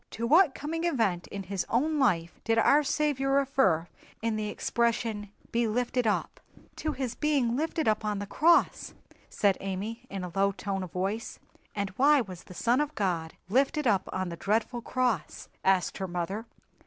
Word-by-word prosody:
"To 230 - -4
what 310 +3 +5
coming 325 +3 -3
event 225 - 0
in 200 -1 -6
his 190 -1 -2
own 300 +6 +1
life 170 -10 +1
did 225 0 +1
our 280 +6 +5
Saviour 280 -2 0
refer 265 - +2 0.3
in 225 0 -1
the 215 -1 -2
expression 230 -2 -1 0.2
'be 235 0 +1
lifted 245 +1 0
up'?" 210 - -1 0.4
"To 310 -1 -2
His 260 -3 -3
being 275 -5 +1
lifted 320 +1 -1
up 215 0 +2
on 210 -1 -1
the 205 - -4
cross," 330 - +2 0.3
said 200 -2 +1
Amy, 210 +6 -5
in 195 -1 -5
a 180 - -5
low 195 0 +2
tone 195 0 -3
of 185 -3 -6
voice. 195 +5 -3 0.4
"And 200 -2 -2
why 290 +2 +6
was 185 -7 -6
the 180 - -12
Son 245 +8 +2
of 295 0 -3
God 170 -5 -1
lifted 275 - +1
up 200 -5 +2
on 185 -1 -2
the 170 - -5
dreadful 225 +6 0
cross?" 240 -9 -2
asked 190 -2 +2
her 190 - -2
mother. 185 +6 -4
225 Hz, 180 wpm, -29 LUFS, 195-270 Hz, 0.4 s, why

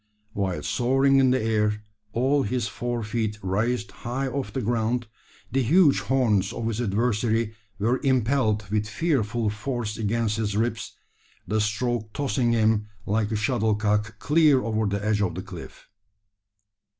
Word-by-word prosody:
While 95 -3 -2
soaring 135 +2 +2
in 130 -1 +5
the 130 +1 +3
air 105 -2 0 0.3
all 135 +5 +2
his 120 0 -1
four 120 -1 -3
feet 110 -1 -2
raised 115 +6 -1
high 130 +3 -3
off 135 0 -3
the 135 - -3
ground 120 +2 0 0.5
the 135 - +2
huge 145 - +5
horns 105 -3 +1
of 115 - -4
his 115 +1 -2
adversary 115 0 0 0.2
were 115 +5 +1
impelled 125 -5 +1
with 105 0 0
fearful 120 -6 0
force 105 0 -3
against 110 0 0
his 105 -2 -1
ribs, 115 0 -2 0.5
the 110 +3 +1
stroke 110 +1 -1
tossing 130 -4 0
him 110 -2 +2 0.2
like 105 +1 0
a - - 0
shuttlecock 105 -1 0
clear 150 0 +4
over 110 -1 0
the 100 +1 -2
edge 105 -1 +1
of 100 - 0
the - - -5
cliff! - - -10
115 Hz, 150 wpm, -25 LUFS, 105-125 Hz, 0.5 s, in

